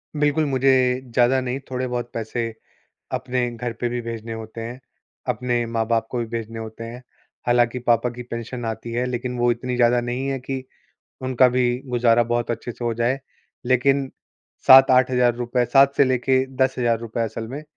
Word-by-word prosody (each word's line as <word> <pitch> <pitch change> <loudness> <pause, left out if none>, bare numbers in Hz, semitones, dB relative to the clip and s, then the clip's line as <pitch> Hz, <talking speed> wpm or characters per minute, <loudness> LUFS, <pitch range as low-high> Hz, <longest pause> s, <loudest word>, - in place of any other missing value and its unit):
बिल्कुल, 150 +1 +2
मुझे 130 -2 +2
ज़्यादा 125 +2 +4
नहीं 130 +1 -3
थोड़े-बहुत 125 -2 -3
पैसे 115 0 -3 0.6
अपने 125 -1 -1
घर 120 0 -4
पे 120 - 0
भी 120 0 -3
भेजने 115 -1 -6
होते 110 0 -7
हैं, 120 +3 -6 0.5
अपने 120 0 0
माँ-बाप 115 0 0
को 125 - -2
भी 115 - -2
भेजने 115 0 -5
होते 110 0 -7
हैं। 120 +2 -8 0.4
हालाँकि 120 0 +2
पापा 120 -1 +2
की 125 +1 -8
पेंशन 120 0 -6
आती 115 +1 -5
है 120 +2 0
लेकिन 125 0 -3
वो 120 0 +3
इतनी 125 +1 -4
ज़्यादा 120 0 +4
नहीं 120 +2 -3
है 135 -1 -1
कि 130 0 -5 0.6
उनका 130 0 +4
भी 125 0 +1 0.2
गुज़ारा 120 -1 +3
बहुत 120 0 -1
अच्छे 120 +1 -4
से 120 - -7
हो 120 - +1
जाए 120 +4 0 0.5
लेकिन 135 +2 +2 0.6
₹7-8,000 125 -2 +5
7 135 +2 +4
से 140 - +6
लेके 130 0 +2
₹10,000 120 -3 0
असल 110 0 -5
में 140 +5 -6
120 Hz, 165 wpm, -22 LUFS, 115-130 Hz, 0.6 s, से